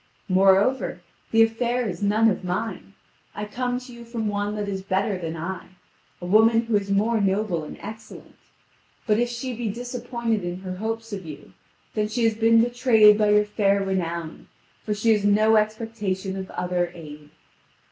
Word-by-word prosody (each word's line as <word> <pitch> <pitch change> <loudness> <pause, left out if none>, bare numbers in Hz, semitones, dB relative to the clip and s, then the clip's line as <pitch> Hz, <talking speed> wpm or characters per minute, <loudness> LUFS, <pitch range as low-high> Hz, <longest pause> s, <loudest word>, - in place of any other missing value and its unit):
Moreover, 195 +3 +3 0.3
the 225 0 +5
affair 235 +2 0
is 190 +1 -5
none 210 +2 +3
of 200 -3 0
mine: 195 +2 -4 0.4
I 210 - -4
come 245 +3 -2
to 250 -1 -12
you 235 0 -11
from 230 -2 -4
one 205 0 -2
that 210 -1 -3
is 195 -1 -3
better 195 +2 -1
than 165 -2 -5
I, 185 +4 -5 0.5
a 175 - -7
woman 220 +4 +5
who 230 -2 -1
is 200 -1 0
more 215 +3 +2
noble 195 -4 0
and 150 - -9
excellent. 220 0 -11 0.7
But 215 0 +2
if 240 0 +1
she 245 +1 -4
be 235 -1 -3
disappointed 235 -2 -3
in 175 +1 -5
her 185 -1 -6
hopes 225 +2 -4
of 195 -2 -5
you, 150 -3 -11 0.4
then 210 -1 0
she 235 +2 -2
has 225 -1 +3
been 225 +1 +4
betrayed 235 -4 +5
by 210 -1 +3
your 210 0 +4
fair 200 -1 +1
renown, 170 -4 -3 0.4
for 210 - -2
she 225 +2 +2
has 210 -2 +2
no 215 +2 +4
expectation 215 -3 -1
of 190 0 -6
other 175 -1 -2
aid. 150 -3 -11
210 Hz, 180 wpm, -24 LUFS, 190-225 Hz, 0.7 s, the